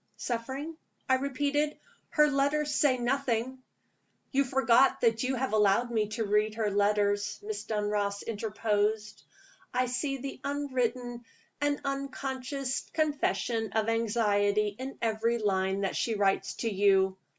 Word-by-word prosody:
"Suffering?" 265 +7 -4 0.3
I 260 - +3
repeated. 290 +2 -1 0.3
"Her 300 -1 +4
letters 290 +1 +1
say 285 -3 +3
nothing 255 0 -1 0.4
" - - -44
"You 275 0 +3
forget 265 0 +4
that 225 -1 +3
you 260 +1 0
have 260 -2 -2
allowed 215 +3 +3
me 215 -2 +1
to 225 - 0
read 210 +1 +1
her 215 -2 0
letters," 205 0 +1
Miss 210 0 -5
Dunross 205 -2 -1
interposed. 210 -1 -1 0.5
"I 255 - +3
see 275 +3 -2
the 270 +1 -7
unwritten 250 -4 -2 0.4
and 290 0 +1
unconscious 275 -1 -3
confession 250 -8 0
of 220 0 +1
anxiety 210 -2 +1
in 265 +1 -6
every 230 +1 +1
line 195 -2 0
that 195 - -1
she 230 - 0
writes 200 -1 +1
to - - +2
you. 190 -1 +3
230 Hz, 135 wpm, -29 LUFS, 210-270 Hz, 0.5 s, Her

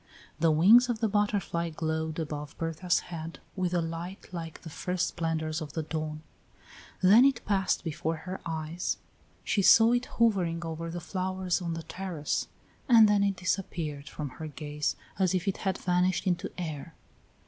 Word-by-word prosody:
The 165 0 +4
wings 210 +11 +7
of 240 - 0
the 225 - +2
butterfly 205 -5 0
glowed 160 0 -2
above 150 -2 -5
Bertha's 165 +2 0
head 165 0 -6 0.2
with 185 -2 0
a 175 -2 +1
light 165 +4 -6
like 165 -2 -6
the 165 - -7
first 180 +2 -1
splendors 160 -1 -2
of 150 -2 -6
the 160 - -2
dawn. 155 0 -4 0.8
Then 210 +7 +8
it 270 -4 +2
passed 195 -2 +1
before 160 0 -2
her 185 +1 -5
eyes, 160 +1 -3 0.5
she 200 - +1
saw 225 +4 +7
it 245 +1 +1
hovering 180 -7 +2
over 165 +1 -4
the 175 +1 -4
flowers 185 +1 -2
on 170 -2 -2
the 165 - -5
terrace, 165 -3 -3 0.4
and 225 -3 +8
then 205 -1 +3
it 200 -1 +1
disappeared 170 -6 -3
from 150 -2 -5
her 155 +4 -7
gaze 150 0 -3 0.2
as 185 -1 +3
if 185 +2 -1
it 195 - 0
had 190 -1 -1
vanished 180 0 +1
into 185 +1 0
air. 160 -2 -5
170 Hz, 170 wpm, -29 LUFS, 160-190 Hz, 0.8 s, Then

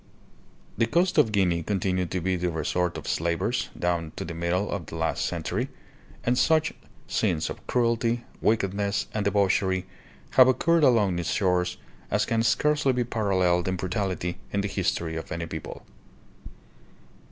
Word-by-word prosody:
The 115 - +3
coast 175 +5 +2
of 115 -7 +4
Guinea 90 -5 +2
continued 90 -1 -1
to 90 - -1
be 95 +2 0
the 90 0 -1
resort 85 +2 -1
of - - -8
slavers 80 -7 0
down 85 -2 -1
to - - -5
the 85 - -5
middle 85 +4 -1
of 95 -5 -4
the - - -7
last 80 0 -1
century, - - -2 0.5
and 125 +1 +2
such 160 -1 +3 0.3
scenes 80 -3 0
of - - -10
cruelty, 115 -1 +1 0.2
wickedness, 100 -2 +1
and 105 - -1
debauchery 95 -2 +2 0.5
have 130 -1 +7
occurred 165 +5 +3
along 105 -9 +4
its 85 - -2
shores 90 -2 +1 0.3
as - - +1
can 115 -1 +1
scarcely 135 +5 +2
be 125 0 +1
paralleled 95 -6 +1
in 95 - 0
brutality 90 -1 -2
in 100 - 0
the 100 - -1
history 85 -4 -1
of 80 - -7
any 85 0 -3
people. 80 -1 -7
95 Hz, 155 wpm, -26 LUFS, 85-115 Hz, 0.5 s, have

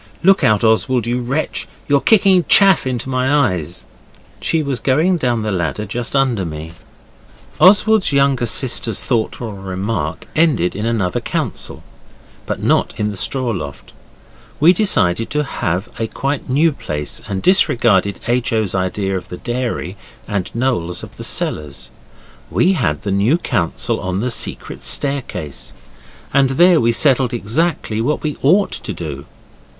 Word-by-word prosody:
Look 195 +2 +4
out, 105 0 +3
Oswald, 115 +2 +2
you 120 +1 -1
wretch, 135 +6 -3 0.2
you're 140 -1 +3
kicking 195 -4 +4
chaff 195 -8 +5
into 125 -1 -3
my 130 +1 0 0.2
eyes.' 90 0 -5 0.5
She 160 -1 0
was 135 -4 -2
going 160 +7 +2
down 120 -6 -1
the 105 - -2
ladder 90 +3 -2
just 120 +6 -3
under 130 -7 +1
me. 80 0 -7 0.9
Oswald's 210 +1 +5
younger 140 -3 +2
sister's 115 -2 +1
thoughtful 115 -2 -2
remark 95 -3 -4
ended 145 - +2
in 105 +3 -2
another 105 -6 -1
council. - - -4 0.6
But - - -4
not - - +1
in 105 0 0
the - - -7
straw 130 +5 0
loft. 70 - -7 0.7
We 165 +5 +6
decided 115 - +1
to 150 0 0
have 95 - -3
a 115 - -1
quite 135 +4 -3
new 150 +6 +3
place, 75 - -5
and 95 -1 -4
disregarded 110 - +3
H. 125 +1 0
O.'s 110 -4 0
idea 95 +1 -1
of 90 - -6
the 90 - -7
dairy 120 -6 -4 0.3
and 100 -4 -2
Noel's 115 -9 -1
of - - -11
the - - -7
cellars. 75 -2 0 0.6
We 185 +2 +2
had 75 - -1
the 100 - -2
new 105 - +2
council 100 - -1
on 95 +1 -3
the 125 +4 -1
secret - - -2
staircase, 135 - -2 0.6
and 135 -1 +4
there 175 -1 +5
we 115 0 +3
settled 130 -1 +2
exactly 115 -1 -1
what 150 +6 -1
we 150 -2 -2
ought 185 +9 +3
to 100 - -4
do. 75 -5 -7
120 Hz, 150 wpm, -18 LUFS, 95-140 Hz, 0.9 s, We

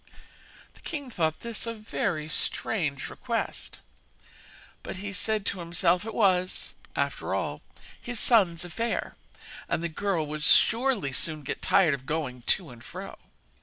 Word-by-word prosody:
The - - -19
king 285 -6 -5
thought 160 -6 0
this 235 0 -5
a 230 - -2
very 175 -7 -2
strange 155 -2 -1
request; - - -4 1.0
but - - -6 0.2
said 215 +2 0
to 190 - 0
himself 175 +2 +2
it 225 - -5
was, 185 -4 +2 0.2
after - - -1
all, - - -2 0.4
his 240 -1 -1
son's 185 -8 +4
affair, 225 +7 -2 0.6
and 165 - 0
the 170 - 0
girl 170 -1 0
would 150 +1 -4
surely 230 - +4
soon 155 +3 0
get - - -4
tired 175 -6 +4
of 135 -1 -5
going 145 -6 -2
to 165 +4 +1
and 120 -1 -13
fro. - - -7
175 Hz, 140 wpm, -28 LUFS, 155-220 Hz, 1.0 s, son's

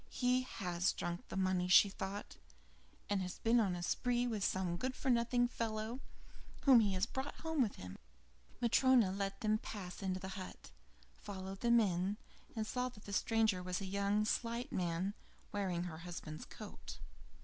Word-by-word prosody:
"He 250 0 +2
has 180 -7 -1
drunk 175 0 -4
the - - -4
money," 185 -1 +1
thought 195 +1 +3
she, - - -21 0.7
"and 200 -2 +1
has 185 0 -4
been 230 +1 +3
on 200 -5 +2
the 175 0 -4
spree 245 +6 +1
with 220 -5 -1
some 185 -3 0
good 255 +8 -2
for 265 - +1
nothing 240 +1 +3
fellow 225 0 -3 0.6
whom 265 -4 +8
he 205 -3 +2
has 185 +2 +1
brought 265 +4 -5
home 320 -3 0
with 220 -5 +1
him." 90 0 -9 0.6
Matryona 240 -3 +5
let 195 0 -3
them 215 0 +2
pass 185 -6 -7
into 190 -1 -1
the 190 0 -6
hut, 190 - -8 0.4
followed 190 - -7
them 235 0 +5
in, 190 -1 +1 0.4
and 220 -1 -1
saw 250 +2 -1
that 215 -4 -15
the 200 - -6
stranger 220 -2 +2
was 180 0 -2
a 200 - -4
young, 200 +2 +1
slight 235 +4 -1
man, 180 +2 -1 0.4
wearing 185 -4 -1
her 165 -3 -6
husband's 165 -3 -7
coat. 65 - -9
200 Hz, 170 wpm, -36 LUFS, 185-235 Hz, 0.7 s, whom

